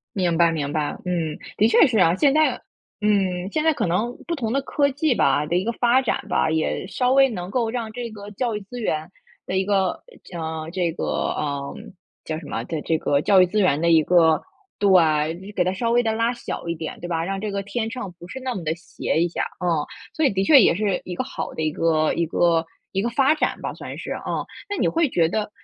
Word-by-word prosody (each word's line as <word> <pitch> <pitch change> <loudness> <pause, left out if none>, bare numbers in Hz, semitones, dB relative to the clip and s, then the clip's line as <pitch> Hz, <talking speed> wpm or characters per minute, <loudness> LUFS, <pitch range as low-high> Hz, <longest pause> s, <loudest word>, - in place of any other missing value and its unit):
明 175 -4 +1
白 170 -1 +5
明 145 -3 -2
白， 150 -2 -1
嗯， 170 -4 -2 0.2
的 215 - +5
确 235 +4 +6
是 225 - 0
啊， 165 -1 +5
现 280 +5 +3
在 310 0 +2 0.4
嗯， 195 -3 +1
现 310 - 0
在 320 -1 +4
可 180 - -1
能 220 +8 -1
不 335 - -1
同 230 -6 -3
的 275 - +1
科 280 +1 +1
技 285 -2 +1
吧， 150 - +2
的 170 +3 -2
一 180 - +2
个 235 - -1
发 245 +3 +3
展 255 - -2
吧， 160 - +2
也 160 +3 -1
稍 250 +4 +1
微 270 -1 +5
能 180 -4 -5
够 230 0 0
让 230 -2 -4
这 240 -1 -5
个 205 -1 -9
教 230 +1 -2
育 210 - -4
资 240 +5 -9
源 155 -4 -2 0.4
的 185 - -3
一 190 - +2
个， 195 -3 0 0.3
呃 160 -1 -4
这 175 -3 0
个， 165 - -4
呃 140 -2 -2 0.5
叫 155 -1 -3
什 160 - -12
么 115 -4 -3
的 160 -3 -4
这 160 - 0
个 145 -2 +1
教 190 +1 +5
育 - - +6
资 210 +4 0
源 155 -6 +3
的 170 - +2
一 160 -2 +5
个 165 -2 +4 0.4
对， 170 0 +2
给 180 - +3
它 185 - 0
稍 230 +4 -1
微 240 +1 +3
地 225 - +1
拉 230 +2 +1
小 240 - -6
一 170 - -1
点， 160 -1 -6
对 175 - -6
吧？ 165 -1 -1
让 195 +2 -3
这 210 +1 -3
个 200 0 -3
天 225 +2 -3
秤 230 -5 -6
不 175 - -10
是 265 - -7
那 255 -1 -2
么 190 -7 -5
地 155 +1 0
斜 170 -1 -2
一 175 - 0
下， - - -2 0.2
嗯。 165 -4 +1 0.3
所 315 - +1
以 - - +5
的 190 0 +1
确 275 +4 +7
也 180 - +4
是 200 -1 0
一 180 - -5
个 255 - -1
好 270 - -6
的 - - -4
一 155 -1 0
个 155 -1 +1
一 170 - +1
个 165 0 +2 0.3
一 195 - 0
个 235 - 0
发 270 +5 +3
展 310 - -1
吧， - - -4
算 - - -8
是 - - -6
啊。 - - -4 0.5
那 410 - -2
你 - - +2
会 330 -2 +2
觉 165 -6 +2
得 210 +2 -2
190 Hz, 265 characters per minute, -23 LUFS, 165-235 Hz, 0.5 s, 确